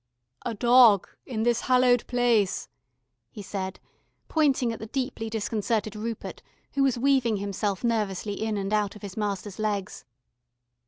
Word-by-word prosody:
"A 230 Hz, -, -3 dB
dog 235 Hz, -3 st, +6 dB, 0.2 s
in 220 Hz, -4 st, -2 dB
this 240 Hz, 0 st, +2 dB
hallowed 250 Hz, -2 st, +3 dB
place," 240 Hz, -5 st, +1 dB, 0.6 s
he 210 Hz, -, -9 dB
said, 190 Hz, -1 st, -5 dB, 0.5 s
pointing 270 Hz, -7 st, +2 dB
at -, -, -8 dB
the 220 Hz, -, -7 dB
deeply 250 Hz, -2 st, -3 dB
disconcerted 215 Hz, -1 st, -1 dB
Rupert 225 Hz, +1 st, -5 dB, 0.3 s
who 280 Hz, -, 0 dB
was 270 Hz, -3 st, +3 dB
weaving 250 Hz, -4 st, +2 dB
himself 200 Hz, 0 st, -2 dB
nervously 210 Hz, -3 st, -1 dB
in 215 Hz, +1 st, -2 dB
and 195 Hz, +1 st, -2 dB
out 210 Hz, -1 st, +1 dB
of 210 Hz, -, -13 dB
his 200 Hz, -2 st, -7 dB
master's 205 Hz, -2 st, -3 dB
legs. 205 Hz, -3 st, -2 dB
220 Hz, 145 wpm, -26 LUFS, 205-245 Hz, 0.6 s, dog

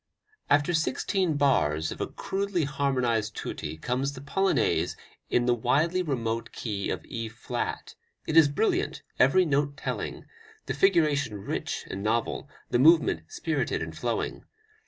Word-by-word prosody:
After 145 Hz, +4 st, +3 dB
sixteen 160 Hz, +2 st, 0 dB
bars 80 Hz, -, +2 dB
of -, -, -6 dB
a -, -, -1 dB
crudely 195 Hz, -3 st, -2 dB
harmonized 125 Hz, -6 st, 0 dB
tutti 75 Hz, +1 st, -5 dB
comes 130 Hz, -, -1 dB
the 130 Hz, -, -9 dB
Polonaise 165 Hz, -, +1 dB, 0.3 s
in 120 Hz, -, +2 dB
the 120 Hz, -, +4 dB
widely 145 Hz, +10 st, +2 dB
remote 115 Hz, -8 st, -2 dB
key 100 Hz, -4 st, -3 dB
of -, -, -3 dB
E 115 Hz, -1 st, -5 dB
flat; 110 Hz, -, -4 dB, 0.3 s
it 160 Hz, -, -2 dB
is 165 Hz, -3 st, +8 dB
brilliant, 145 Hz, -, 0 dB, 0.2 s
every 180 Hz, +9 st, +5 dB
note 145 Hz, -1 st, 0 dB
telling, -, -, -4 dB, 0.4 s
the -, -, -2 dB
figuration 155 Hz, -, +2 dB
rich 100 Hz, -, -4 dB
and 95 Hz, -, -5 dB
novel, 110 Hz, +2 st, -1 dB, 0.2 s
the 120 Hz, -, +3 dB
movement 160 Hz, +5 st, +4 dB
spirited -, -, -1 dB
and -, -, -7 dB
flowing. -, -, -2 dB
140 Hz, 140 wpm, -27 LUFS, 115-160 Hz, 0.4 s, is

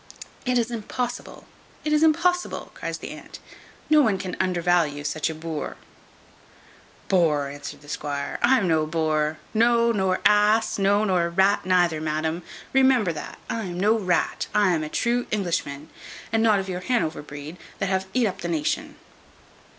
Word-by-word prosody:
"It 250 Hz, 0 st, +2 dB
is 240 Hz, 0 st, 0 dB
impossible, 240 Hz, +2 st, -5 dB, 0.4 s
it 305 Hz, -, +1 dB
is 300 Hz, -, +3 dB
impossible," 340 Hz, +3 st, +1 dB
cries -, -, -5 dB
the -, -, -8 dB
aunt; -, -, -10 dB, 0.5 s
"no 305 Hz, -1 st, +6 dB
one 220 Hz, -8 st, +2 dB
can 185 Hz, -1 st, -5 dB
undervalue 175 Hz, -5 st, +1 dB
such 150 Hz, +2 st, -1 dB
a 160 Hz, -, -5 dB
boor." 160 Hz, -1 st, -5 dB, 1.3 s
"Boar," 155 Hz, -7 st, +2 dB
answered 145 Hz, 0 st, -8 dB
the 145 Hz, -, -16 dB
squire, 145 Hz, -1 st, -4 dB
"I 260 Hz, +2 st, +5 dB
am 200 Hz, -6 st, 0 dB
no 160 Hz, -2 st, +2 dB
boar; 155 Hz, -1 st, 0 dB, 0.2 s
no, 235 Hz, +1 st, +4 dB
nor 190 Hz, -4 st, +1 dB
ass; 210 Hz, +1 st, +4 dB
no, 200 Hz, +2 st, +3 dB
nor 180 Hz, -4 st, +1 dB
rat 190 Hz, +2 st, +2 dB
neither, 175 Hz, -4 st, +3 dB
madam. 160 Hz, +2 st, -2 dB, 0.3 s
Remember 260 Hz, -9 st, +4 dB
that 155 Hz, -, -7 dB
I 225 Hz, -2 st, -3 dB
am 175 Hz, -1 st, -5 dB
no 210 Hz, +4 st, +4 dB
rat. 180 Hz, -4 st, 0 dB
I 205 Hz, -3 st, +4 dB
am 160 Hz, -2 st, 0 dB
a 155 Hz, -, -5 dB
true 240 Hz, +7 st, 0 dB
Englishman, 165 Hz, -7 st, -2 dB, 0.4 s
and 225 Hz, -, +3 dB
not 220 Hz, -2 st, +4 dB
of 195 Hz, -1 st, -3 dB
your 180 Hz, -1 st, -4 dB
Hanover 205 Hz, -8 st, -1 dB
breed, 145 Hz, +3 st, -9 dB, 0.2 s
that 195 Hz, -, -1 dB
have 190 Hz, 0 st, 0 dB
eat 250 Hz, -2 st, +3 dB
up 195 Hz, -, -3 dB
the 170 Hz, -, -3 dB
nation." 160 Hz, -3 st, -2 dB
185 Hz, 165 wpm, -24 LUFS, 160-225 Hz, 1.3 s, no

